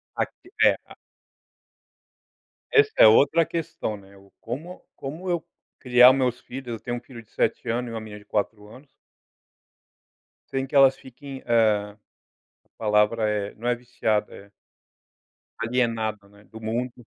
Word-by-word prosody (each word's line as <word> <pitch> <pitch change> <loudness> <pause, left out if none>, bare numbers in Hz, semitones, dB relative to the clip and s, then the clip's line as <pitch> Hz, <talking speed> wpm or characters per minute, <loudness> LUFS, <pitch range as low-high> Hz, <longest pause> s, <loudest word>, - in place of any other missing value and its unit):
Aqui 360 - -4
é, - - +5
a - - -14 1.8
Essa 430 0 +5
é - - +9
outra 145 +9 +5
questão, 165 -11 -4
né, 100 0 -17
o 100 0 -19
como 150 +10 -7 0.2
como 155 +7 -7
eu 175 -2 0 0.4
criar 125 0 +7
os - - +1
meus 125 -2 0
filhos, 130 0 -9
eu - - -10
tenho 120 +2 -4
um - - -5
filho 125 -2 -12
de - - -33
7 - - -1
ano 120 +2 -1
e - - -6
uma 115 - -4
menina 105 -1 -9
de 105 - -19
4 105 0 -3
anos. 130 +6 -15 1.6
Sem 135 0 -2
que 135 - -8
elas 135 -1 +7
fiquem, 135 +1 -11
eh, 105 -3 +2 0.7
a - - -37
palavra 105 +1 +2
é, 105 -1 -2
não 120 +3 -6
é 125 - +2
viciada 115 -3 -2
é 100 0 -14 1.1
alienada, 110 -4 -1
né, 100 +1 -20
do 110 +1 -11
mundo. 120 +2 -4
120 Hz, 155 wpm, -25 LUFS, 105-130 Hz, 1.8 s, é